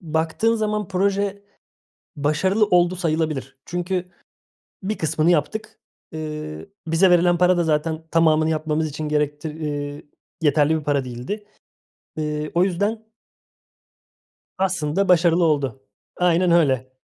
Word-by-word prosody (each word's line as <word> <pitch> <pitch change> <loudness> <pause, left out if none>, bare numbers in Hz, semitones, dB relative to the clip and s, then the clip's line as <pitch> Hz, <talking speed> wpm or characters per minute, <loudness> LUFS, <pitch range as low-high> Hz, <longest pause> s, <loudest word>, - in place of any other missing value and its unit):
Baktığın 160 +7 0
zaman 210 -3 -1
proje 200 +1 0 0.7
başarılı 155 +9 +2
oldu 180 -1 +3
sayılabilir. 160 -6 -2
Çünkü 180 +1 -2 0.8
bir 210 +3 -2
kısmını 160 +1 +1
yaptık. 215 +8 -1 0.3
Iıı, 155 +2 -6 0.2
bize 165 +4 +4
verilen 175 0 +4
para 180 0 +4
da 175 - +2
zaten 160 0 0
tamamını 160 -1 +3
yapmamız 155 0 0
için 150 +1 -5
gerektir 150 +1 -2
ııı, 145 -1 -4 0.4
yeterli 150 0 +3
bir - - -11
para 145 -2 0
değildi. 125 - -6 0.7
Iıı, 150 0 -2
o 175 +2 +4
yüzden 210 +4 -2 1.5
aslında 185 -1 0
başarılı 170 -1 +4
oldu. 140 -5 0 0.4
Aynen 180 0 +3
öyle. 130 -6 +2
160 Hz, 115 wpm, -22 LUFS, 150-185 Hz, 1.5 s, bize